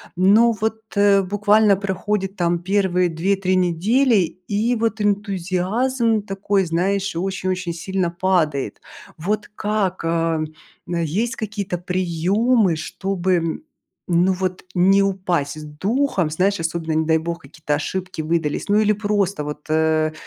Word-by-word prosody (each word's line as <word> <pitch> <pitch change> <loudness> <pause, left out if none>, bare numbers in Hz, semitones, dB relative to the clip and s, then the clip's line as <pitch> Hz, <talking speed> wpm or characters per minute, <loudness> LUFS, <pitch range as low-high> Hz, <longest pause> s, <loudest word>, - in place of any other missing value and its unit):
Но 205 +6 +5
вот, 220 0 -2
э, 200 -1 +4
буквально 205 +2 +3
проходит 195 0 -2
там 175 -1 +1
первые 180 -1 +1
2-3 185 +3 0
недели, 200 +9 +2 0.3
и 220 +4 +1
вот 225 -1 -1
энтузиазм 205 +4 0
такой, 195 -1 0
знаешь, 185 +3 -1
очень 185 +1 -2
очень 185 -2 -2
сильно 180 +1 -2
падает. 170 -6 0 0.4
Вот 205 +6 -2
как, 205 -4 -1
э, 165 -1 0 0.4
есть 175 - -1
какие-то 205 -4 -4
приемы, 185 +4 +1
чтобы, 180 0 -1 0.5
ну, 180 +2 +3
вот 185 0 -3
не 190 +2 +5
упасть 180 -7 -1
з - - -8
духом, 190 - 0
знаешь, 190 +6 +1
особенно, 165 -1 -2
не 160 - 0
дай 160 0 +3
бог, 170 +1 -4
какие-то 155 -1 -5
ошибки 180 +3 -4
выдались. 155 -2 -1
Ну, 205 +1 +4
или 215 0 +3
просто 200 -5 -1
вот, 150 0 -7
э, 155 0 +2
185 Hz, 130 wpm, -21 LUFS, 170-205 Hz, 0.5 s, Но